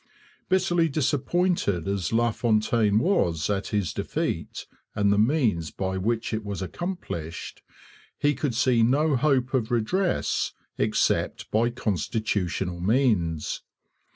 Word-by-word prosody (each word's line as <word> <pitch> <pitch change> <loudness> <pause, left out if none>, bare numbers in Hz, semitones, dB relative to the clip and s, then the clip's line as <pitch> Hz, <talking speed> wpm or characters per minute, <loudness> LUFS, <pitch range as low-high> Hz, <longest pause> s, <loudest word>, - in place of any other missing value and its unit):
Bitterly 175 -3 +2
disappointed 145 - 0
as 100 -4 -1
LaFontaine 110 -2 +2
was 105 - +1
at 100 -1 -1
his 100 -7 -1
defeat - - -3 0.3
and 100 -1 +3
the 100 - +2
means 110 - +2
by 95 +5 -3
which 115 +5 -1
it 110 0 -2
was 100 -2 -4
accomplished, 95 - -5 0.6
he 145 0 +2
could 135 -3 -2
see 120 -1 +3
no 140 +6 +3
hope 130 -1 +1
of 120 -4 +1
redress 170 - 0 0.2
except - - 0
by 115 +3 +3
constitutional 100 -5 -2
means. 95 - +1
115 Hz, 115 wpm, -26 LUFS, 100-135 Hz, 0.6 s, and